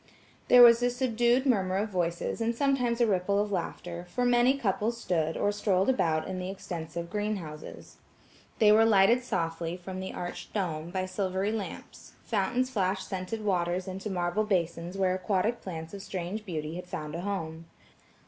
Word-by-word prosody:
There 245 -1 +9
was 235 0 +8
a 245 - +3
subdued 245 0 +2
murmur 190 -7 +2
of 210 +2 -1
voices 175 +2 -2
and 230 +1 0
sometimes 250 -3 +1
a - - +6
ripple 200 -1 +1
of 205 0 -1
laughter, 175 -1 -4
for 245 +6 -1
many 245 +2 +4
couples 225 -1 0
stood, 165 -6 -1
or 205 - +1
strolled 200 0 +1
about 160 -11 +1
the 185 -1 -4
extensive 170 -3 -6
greenhouses. 200 -8 -5 0.6
They 210 -2 +6
were 220 +1 +6
lighted 225 +3 +5
softly, 165 -4 -2
from 185 +1 -7
the 190 - -4
arched 175 0 -6
dome, 165 -5 -2
by 185 +1 -2
silvery 190 +1 -1
lamps; 220 -3 -7
fountains 245 +5 0
flashed 190 -4 -1
scented 190 +4 -4
waters 180 -1 0
into 190 +3 -5
marble 180 +2 0
basins 175 -2 -1
where 190 -1 +2
aquatic 195 +4 0
plants 165 -2 -7
of 200 - -6
strange 190 +4 -5
beauty 160 -1 -4
had 180 0 -8
found 150 -3 -5
a 170 - -4
home. 165 -4 -4
190 Hz, 165 wpm, -29 LUFS, 175-220 Hz, 0.6 s, There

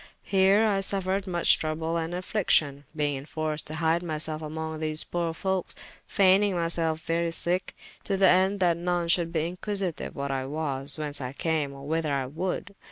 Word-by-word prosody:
Heere 195 +2 +5
I 200 -2 +2
suffered 195 0 -1
muche 175 -2 +4
trouble 160 +1 -2
and 165 +1 -2
affliction, 160 -7 +1
beyng 145 -2 +1
enforced 155 +1 -3
to 155 - -4
hyde 165 +1 +1
myselfe 155 -2 -3
among 160 0 -5
these 155 0 -1
poore 170 -1 -2
folkes, 190 0 -2 0.3
fayning 195 0 +4
myselfe 165 -2 0
very 170 +1 0
sicke, 175 +2 -1 0.3
to 195 - 0
the 190 0 +6
ende 190 +2 +4
that 175 -2 +3
none 175 0 -1
should 170 -1 +2
be 165 +1 -1
inquisityue 195 -3 -3
what 140 -1 -3
I 135 -1 -2
was, 140 -2 0
whence 150 -2 -3
I 125 0 -4
came, 155 -2 -1
or 140 0 -10
whyther 160 -1 0
I 135 -2 0
would. 180 +7 -4
165 Hz, 175 wpm, -27 LUFS, 155-185 Hz, 0.3 s, the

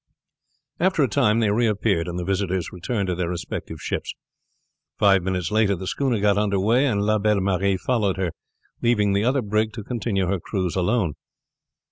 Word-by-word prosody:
After 185 -4 +2
a - - +3
time 105 0 +2
they 105 -2 +2
reappeared, 105 -5 +1
and 85 0 -4
the 90 - -3
visitors 95 -2 -1
returned 100 +4 -2
to 90 - -1
their 85 -1 -2
respective 90 -1 -5
ships. - - -4 0.8
Five 100 -2 +4
minutes 90 0 -2
later 105 -2 +3
the 95 +1 -7
schooner 125 +2 0
got 100 0 +3
under 100 -2 +1
way, 120 +8 +3
and 100 -5 0
La 110 +1 +2
Belle 105 0 +2
Marie 95 0 +1
followed 100 -2 0
her, 95 -3 -1 0.5
leaving 105 -4 +2
the 100 +1 +1
other 130 +2 +1
brig 110 +1 0
to 110 - -7
continue 110 -5 -1
her 95 +1 -1
cruise 95 -2 -3
alone. 95 -2 +1
100 Hz, 180 wpm, -23 LUFS, 95-110 Hz, 0.8 s, Five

